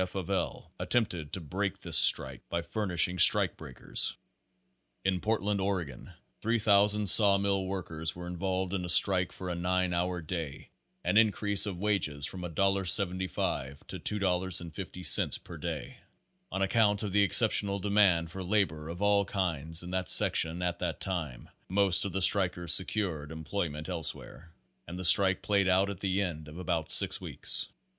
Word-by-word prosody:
F. 90 +1 -10
of 95 0 -6
L., 95 -3 -5
attempted 90 -11 -2
to - - -2
break 95 +5 -5
this - - -4
strike - - +4
by 85 0 -4
furnishing 90 -3 0
strike - - +7
breakers. 65 - +1 0.9
In 95 -1 -1
Portland, 105 -2 -2
Oregon, 90 -10 -5 0.3
3,000 105 -2 +1
saw 100 0 +7
mill 100 -1 -2
workers 80 -4 -4
were 90 0 -10
involved 95 +1 -5
in 95 -2 -4
a 90 - -6
strike 90 0 +5
for 95 - -10
a 90 - -4
nine 90 +1 -2
hour 90 +1 -3
day 80 -3 -8 0.3
and 105 - +2
increase 105 -2 +1
of 95 -1 -7
wages 75 -9 -2
from 90 - -7
$1.75 95 -5 -2
to - - -9
$2.50 90 -3 0
per - - -12
day. - - -7 0.5
On 95 +1 -3
account 105 0 0
of 105 - -5
the 100 +2 +1
exceptional 100 -1 +4
demand 95 -5 0
for 95 - -8
labor 90 -5 -3
of 85 +4 -7
all 100 0 +2
kinds 80 -5 -3
in 90 - -10
that 95 -1 -4
sec - - +5
tion 80 +3 +1
at 85 -1 -4
that 85 -3 -5
time, 85 -10 -6 0.2
most 95 -1 +4
of 100 - -5
the 95 +1 -1
strikers 90 -4 +4
secured 90 -6 -1
employ 80 +3 -5
ment 75 +1 -9
elsewhere, 85 -1 -8 0.4
and 90 - -9
the 95 - -6
strike 95 +2 +5
played 100 -2 0
out 95 +2 0
at 95 - -10
the 100 0 -2
end 80 -5 -7
of 75 +2 -12
about 85 -3 -4
six - - +2
weeks. - - 0
95 Hz, 165 wpm, -28 LUFS, 85-100 Hz, 0.9 s, strike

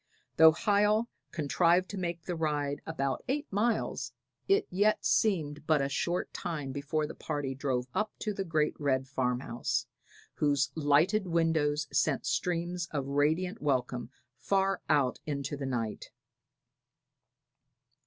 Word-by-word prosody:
Though 160 0 +9
Hiel 210 +5 +2 0.2
contrived 170 +4 +2
to 205 - -5
make 170 -2 -3
the 175 - -3
ride 145 -3 -1
about 140 -4 -2
eight 285 +3 -1
miles, 220 +3 0 0.3
it 395 +1 +3
yet 205 +4 +2
seemed 155 -8 +1
but 155 -2 +4
a 135 0 0
short 175 +5 -1
time 155 -7 -4
before 150 +3 -1
the - - -7
party 145 -3 -3
drove 130 -2 -1
up 215 0 0
to 215 - -3
the 195 - -3
great 155 -4 +1
red 135 -2 +1
farmhouse, 125 -1 -1 0.5
whose 140 -2 +2
lighted 160 +8 +3
windows 160 -3 +1
sent 145 -4 +1
streams 175 0 -1
of 140 -3 -3
radiant 160 +8 +1
welcome 125 -4 -1 0.3
far 195 0 +1
out 140 -4 +2
into 140 -1 -2
the 140 -1 -4
night. 115 -4 -3
155 Hz, 135 wpm, -30 LUFS, 140-180 Hz, 0.5 s, Though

